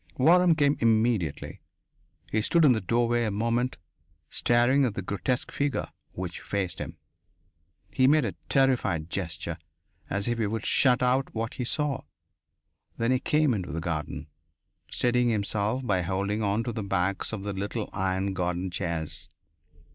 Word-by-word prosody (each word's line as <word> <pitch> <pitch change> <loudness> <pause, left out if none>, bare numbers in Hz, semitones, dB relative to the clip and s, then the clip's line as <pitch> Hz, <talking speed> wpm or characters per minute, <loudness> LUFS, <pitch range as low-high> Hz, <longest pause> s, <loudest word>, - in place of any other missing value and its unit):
Waram 170 +4 +5
came 145 -1 +3
immediately. 110 - +1 0.7
He 110 - +2
stood 165 +8 +3
in 140 - +7
the 110 -3 +2
doorway 120 +4 +1
a 110 - 0
moment, 115 +4 0 0.5
staring 120 +4 +3
at 120 -6 0
the 95 - -3
grotesque 100 +7 -2
figure 140 -1 -1 0.2
which 90 -1 -5
faced 95 -5 -3
him. - - -6 1.0
He 130 - +4
made 150 -1 +4
a - - -2 0.2
terrified 125 - +2
gesture, 90 -4 -4 0.5
as 100 +2 -1
if 120 -1 -1
he 110 - +1
would 110 +1 -3
shut 125 -2 +3
out 130 +1 +1
what 115 +1 -2
he 125 - -3
saw. 145 +1 0 1.0
Then 115 +2 +1
he 130 - +3
came 150 0 +2
into 95 -8 -3
the 80 - -3
garden, 80 -2 -4 0.6
steadying 125 0 +2
himself 110 +3 -1
by 95 -5 +1
holding 100 +4 -1
on 105 +2 +1
to 120 - -3
the 115 -1 -4
backs 95 -1 -1
of 105 -3 -5
the 100 0 -3
little 100 +3 -3
iron 95 0 -1
garden 90 0 -2
chairs. 80 -4 -3
110 Hz, 155 wpm, -27 LUFS, 95-125 Hz, 1.0 s, in